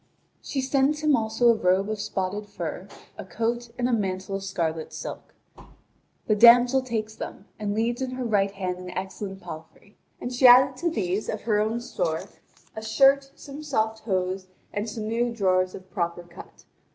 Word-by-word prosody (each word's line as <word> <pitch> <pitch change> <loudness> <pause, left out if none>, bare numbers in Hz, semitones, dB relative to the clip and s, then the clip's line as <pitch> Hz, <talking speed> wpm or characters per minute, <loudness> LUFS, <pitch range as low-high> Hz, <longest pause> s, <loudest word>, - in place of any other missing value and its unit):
She 270 - -3
sends 275 +3 +1
him 305 -2 +4
also 225 +1 +2
a - - +7
robe 190 -1 +2
of 215 -1 -3
spotted 200 +2 -3
fur, 180 -1 -6 0.3
a - - -4
coat, 235 +4 -2
and 245 0 +1
a 250 - 0
mantle 190 -2 -2
of 195 - -8
scarlet 165 -5 -2
silk. - - -8 0.9
The 215 - +2
damsel 245 +4 +7
takes 220 -4 -3
them, 200 - -8
and 205 -1 -2
leads 235 +3 0
in 260 - -1
her 255 0 -4
right 205 -4 +2
hand 185 -2 -4
an 180 0 -8
excellent 190 0 -5
palfrey. 160 +6 -11 0.2
And 245 - -5
she 250 +1 +6
added 255 +2 +7
to 340 +4 0
these, 200 - -2
of 215 - -3
her 215 -2 +1
own 220 +3 0
store, 170 -8 -2 0.5
a 220 - -5
shirt, 275 +4 +4
some 285 -1 -9
soft 220 -7 -1
hose, 185 -2 -2 0.3
and 205 +2 -2
some 215 0 -5
new 235 +2 0
drawers 185 -4 +1
of 185 -1 -12
proper 175 -2 -2
cut. 175 +1 -14
215 Hz, 180 wpm, -25 LUFS, 190-240 Hz, 0.9 s, a